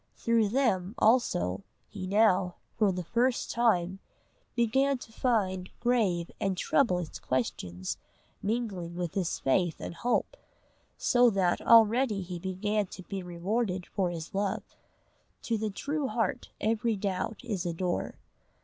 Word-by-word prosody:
Through 230 Hz, -3 st, +2 dB
them, 215 Hz, -5 st, +1 dB
also, 100 Hz, -, +2 dB, 0.2 s
he 190 Hz, -3 st, -6 dB
now, 190 Hz, -3 st, +3 dB, 0.2 s
for 210 Hz, -3 st, +3 dB
the 180 Hz, -1 st, -3 dB
first 240 Hz, +7 st, +1 dB
time, 190 Hz, -6 st, +2 dB, 0.6 s
began 265 Hz, +4 st, +2 dB
to 235 Hz, -, -12 dB
find 190 Hz, -7 st, 0 dB
grave 210 Hz, -9 st, +1 dB
and 195 Hz, -3 st, 0 dB
troublous 180 Hz, -, +1 dB
questions 95 Hz, -8 st, -2 dB, 0.4 s
mingling 200 Hz, -6 st, -2 dB
with 175 Hz, -2 st, -3 dB
his 185 Hz, -4 st, -1 dB
faith 165 Hz, +5 st, +1 dB
and -, -, -5 dB
hope; 245 Hz, -, 0 dB, 0.6 s
so 245 Hz, -1 st, +4 dB
that 190 Hz, -4 st, +1 dB
already 225 Hz, -2 st, +5 dB
he 180 Hz, -1 st, -6 dB
began 195 Hz, +3 st, -1 dB
to 185 Hz, -, -10 dB
be 195 Hz, +1 st, -5 dB
rewarded 180 Hz, +2 st, -2 dB
for 190 Hz, -3 st, -1 dB
his 165 Hz, -2 st, -6 dB
love: 195 Hz, 0 st, -1 dB, 0.8 s
to 230 Hz, -, 0 dB
the 215 Hz, 0 st, -1 dB
true 285 Hz, +7 st, -2 dB
heart 235 Hz, +2 st, -1 dB
every 225 Hz, +1 st, +1 dB
doubt 200 Hz, +2 st, -2 dB
is 205 Hz, -7 st, -2 dB
a -, -, 0 dB
door. 175 Hz, +1 st, -2 dB
200 Hz, 135 wpm, -29 LUFS, 180-230 Hz, 0.8 s, already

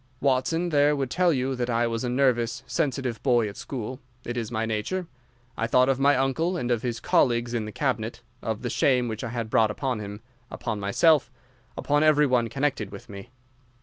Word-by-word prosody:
Watson 140 Hz, +6 st, +1 dB
there 145 Hz, -1 st, +3 dB
would 135 Hz, -3 st, -2 dB
tell 180 Hz, -1 st, +3 dB
you 130 Hz, -2 st, 0 dB
that 125 Hz, -1 st, -2 dB
I 120 Hz, 0 st, +2 dB
was 115 Hz, 0 st, -2 dB
a 125 Hz, -, -1 dB
nervous, 120 Hz, -2 st, +1 dB
sensitive 135 Hz, -7 st, -2 dB
boy 120 Hz, -4 st, +3 dB
at 100 Hz, -, -7 dB
school. 130 Hz, -1 st, -6 dB, 0.3 s
It 120 Hz, -, -4 dB
is 115 Hz, -3 st, -3 dB
my 110 Hz, -1 st, -1 dB
nature. 110 Hz, -, -2 dB, 0.5 s
I 115 Hz, -, -1 dB
thought 125 Hz, +2 st, +4 dB
of 135 Hz, -1 st, +1 dB
my 140 Hz, +1 st, +4 dB
uncle 160 Hz, +7 st, 0 dB
and 125 Hz, -6 st, -2 dB
of 120 Hz, -2 st, +1 dB
his 120 Hz, -2 st, -3 dB
colleagues 120 Hz, -1 st, +2 dB
in 115 Hz, -3 st, -1 dB
the 105 Hz, -, -6 dB
Cabinet, 120 Hz, -3 st, -2 dB, 0.2 s
of 110 Hz, +1 st, -3 dB
the 120 Hz, -, -2 dB
shame 125 Hz, -3 st, +2 dB
which 110 Hz, 0 st, -5 dB
I 120 Hz, -, -3 dB
had 115 Hz, -1 st, -3 dB
brought 110 Hz, -1 st, +4 dB
upon 125 Hz, +2 st, -2 dB
him, 105 Hz, 0 st, -7 dB, 0.3 s
upon 110 Hz, -2 st, -4 dB
myself, 130 Hz, +8 st, +3 dB, 0.5 s
upon 145 Hz, 0 st, +1 dB
every 155 Hz, -1 st, +5 dB
one 125 Hz, -4 st, +2 dB
connected 135 Hz, -5 st, -2 dB
with 115 Hz, +5 st, -11 dB
me. 100 Hz, -1 st, -9 dB
125 Hz, 205 wpm, -26 LUFS, 115-140 Hz, 0.5 s, every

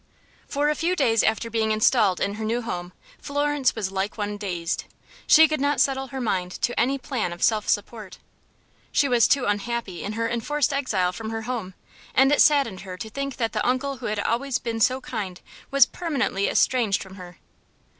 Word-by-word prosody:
For 290 Hz, +1 st, 0 dB
a 300 Hz, -, +3 dB
few 340 Hz, +4 st, 0 dB
days 225 Hz, -, +3 dB
after 225 Hz, +1 st, 0 dB
being 220 Hz, -1 st, 0 dB
installed 215 Hz, -3 st, +3 dB
in 200 Hz, -, -1 dB
her 220 Hz, +1 st, -6 dB
new 230 Hz, +3 st, -1 dB
home 180 Hz, -5 st, -5 dB, 0.3 s
Florence 290 Hz, -2 st, 0 dB
was 205 Hz, -4 st, -3 dB
like 195 Hz, +2 st, -3 dB
one 205 Hz, -1 st, -3 dB
dazed. 180 Hz, -5 st, -3 dB, 0.4 s
She 320 Hz, +1 st, +8 dB
could 310 Hz, -2 st, -2 dB
not 285 Hz, 0 st, +1 dB
settle 270 Hz, -1 st, +1 dB
her 270 Hz, 0 st, -6 dB
mind 185 Hz, -7 st, -1 dB
to 240 Hz, -, 0 dB
any 270 Hz, +3 st, +2 dB
plan 250 Hz, -8 st, -3 dB
of 175 Hz, -, -6 dB
self 215 Hz, -2 st, +2 dB
support. 205 Hz, -2 st, -2 dB, 0.7 s
She 285 Hz, -, +3 dB
was 245 Hz, -3 st, +4 dB
too 275 Hz, -2 st, +2 dB
unhappy 205 Hz, -2 st, -2 dB
in 205 Hz, -, -4 dB
her 230 Hz, +1 st, -1 dB
enforced 270 Hz, +5 st, 0 dB
exile 205 Hz, -10 st, 0 dB
from 220 Hz, +3 st, -6 dB
her 225 Hz, 0 st, -4 dB
home, 220 Hz, -6 st, -4 dB, 0.4 s
and 270 Hz, +1 st, +5 dB
it 290 Hz, -, +4 dB
saddened 275 Hz, -10 st, +3 dB
her 185 Hz, -1 st, -8 dB
to 220 Hz, +4 st, -7 dB
think 275 Hz, +1 st, -4 dB
that 230 Hz, -2 st, -1 dB
the -, -, -1 dB
uncle 260 Hz, +2 st, 0 dB
who -, -, -5 dB
had 210 Hz, 0 st, -2 dB
always 245 Hz, +5 st, 0 dB
been 230 Hz, -1 st, -4 dB
so 255 Hz, +4 st, +2 dB
kind 200 Hz, -8 st, -5 dB, 0.3 s
was 275 Hz, -2 st, +6 dB
permanently 275 Hz, -, -1 dB
estranged 230 Hz, -6 st, +2 dB
from 190 Hz, -1 st, -13 dB
her. 180 Hz, -2 st, -11 dB
230 Hz, 195 wpm, -24 LUFS, 205-270 Hz, 0.7 s, She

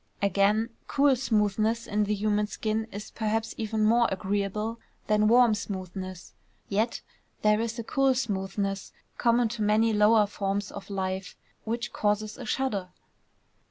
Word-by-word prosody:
Again, 205 Hz, +3 st, +2 dB, 0.2 s
cool 280 Hz, -1 st, +4 dB
smoothness 220 Hz, -1 st, +1 dB
in 210 Hz, 0 st, 0 dB
the 210 Hz, +1 st, 0 dB
human 210 Hz, 0 st, +1 dB
skin 220 Hz, +2 st, -2 dB
is 210 Hz, +2 st, -7 dB
perhaps 220 Hz, 0 st, -1 dB
even 220 Hz, -1 st, -1 dB
more 235 Hz, +2 st, +4 dB
agreeable 205 Hz, +4 st, -2 dB, 0.3 s
than 215 Hz, 0 st, +3 dB
warm 240 Hz, 0 st, +6 dB
smoothness; 185 Hz, -3 st, -6 dB, 0.3 s
yet 220 Hz, +4 st, 0 dB, 0.4 s
there 210 Hz, +1 st, +4 dB
is 230 Hz, 0 st, -3 dB
a 230 Hz, -, -3 dB
cool 270 Hz, +3 st, +2 dB
smoothness 195 Hz, -4 st, -2 dB, 0.3 s
common 235 Hz, 0 st, +3 dB
to 225 Hz, -1 st, -5 dB
many 215 Hz, +2 st, +3 dB
lower 210 Hz, +1 st, +5 dB
forms 200 Hz, 0 st, -3 dB
of 200 Hz, 0 st, -9 dB
life 190 Hz, -1 st, -3 dB, 0.3 s
which 235 Hz, +2 st, -3 dB
causes 210 Hz, 0 st, 0 dB
a 250 Hz, -, -6 dB
shudder. 210 Hz, -8 st, -1 dB
215 Hz, 140 wpm, -27 LUFS, 200-230 Hz, 0.4 s, warm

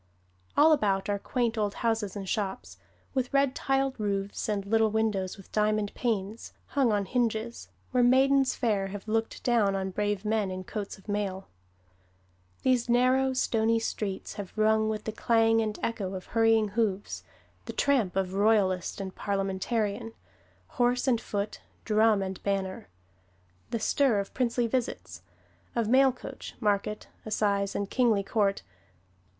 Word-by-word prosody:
All 310 Hz, +2 st, +7 dB
about 200 Hz, -9 st, +2 dB
are 200 Hz, 0 st, 0 dB
quaint 235 Hz, 0 st, -1 dB
old 205 Hz, -1 st, -1 dB
houses 225 Hz, -4 st, -1 dB
and 195 Hz, -2 st, -5 dB
shops, 195 Hz, -1 st, -3 dB, 0.3 s
with 260 Hz, -2 st, -1 dB
red 275 Hz, -1 st, +3 dB
tiled 270 Hz, -2 st, 0 dB
roofs, 200 Hz, 0 st, -2 dB
and 200 Hz, -2 st, -1 dB
little 220 Hz, +1 st, +3 dB
windows, 210 Hz, -4 st, -1 dB
with 195 Hz, -, -15 dB
diamond 215 Hz, -1 st, +1 dB
panes, 215 Hz, -2 st, -3 dB, 0.2 s
hung 270 Hz, -6 st, +2 dB
on 205 Hz, -1 st, +1 dB
hinges, 235 Hz, +1 st, -2 dB, 0.2 s
where 250 Hz, -, +3 dB
maidens 265 Hz, +2 st, +4 dB
fair 205 Hz, -5 st, 0 dB
have 200 Hz, +2 st, -8 dB
looked 225 Hz, +1 st, -1 dB
down 220 Hz, -5 st, +2 dB
on 190 Hz, 0 st, -2 dB
brave 205 Hz, +1 st, -1 dB
men 210 Hz, -2 st, +1 dB
in 185 Hz, 0 st, -5 dB
coats 205 Hz, +2 st, -5 dB
of 195 Hz, -, -20 dB
mail. 200 Hz, -2 st, -3 dB, 1.1 s
These 250 Hz, -2 st, +2 dB
narrow, 255 Hz, +2 st, +3 dB
stony 230 Hz, -3 st, +2 dB
streets 210 Hz, -3 st, -3 dB
have 200 Hz, 0 st, -8 dB
rung 220 Hz, 0 st, +3 dB
with 215 Hz, -1 st, -3 dB
the 220 Hz, -, -3 dB
clang 225 Hz, 0 st, +3 dB
and 215 Hz, -1 st, -2 dB
echo 195 Hz, -5 st, -2 dB
of 185 Hz, -, -6 dB
hurrying 225 Hz, -2 st, +4 dB
hoofs; 205 Hz, -2 st, -1 dB, 0.4 s
the -, -, -6 dB
tramp 250 Hz, -11 st, +1 dB
of 190 Hz, -1 st, -1 dB
Royalist 195 Hz, -3 st, +2 dB
and 190 Hz, -1 st, -5 dB
Parliamentarian, 200 Hz, +3 st, -2 dB, 0.5 s
horse 245 Hz, 0 st, 0 dB
and 235 Hz, -3 st, +2 dB
foot, 205 Hz, 0 st, -4 dB, 0.2 s
drum 215 Hz, -2 st, +3 dB
and 190 Hz, -1 st, -5 dB
banner; 195 Hz, -, -2 dB, 0.8 s
the -, -, -1 dB
stir 255 Hz, 0 st, +2 dB
of 195 Hz, -, -5 dB
princely 245 Hz, -1 st, +1 dB
visits, 90 Hz, -, -3 dB, 0.5 s
of 230 Hz, -2 st, +1 dB
mail 265 Hz, +3 st, +5 dB
coach, 250 Hz, -, -9 dB
market, 210 Hz, -1 st, -1 dB, 0.2 s
assize 200 Hz, -2 st, 0 dB
and 200 Hz, -1 st, -2 dB
kingly 230 Hz, -6 st, +3 dB
court. 200 Hz, -1 st, 0 dB
215 Hz, 150 wpm, -28 LUFS, 200-235 Hz, 1.1 s, All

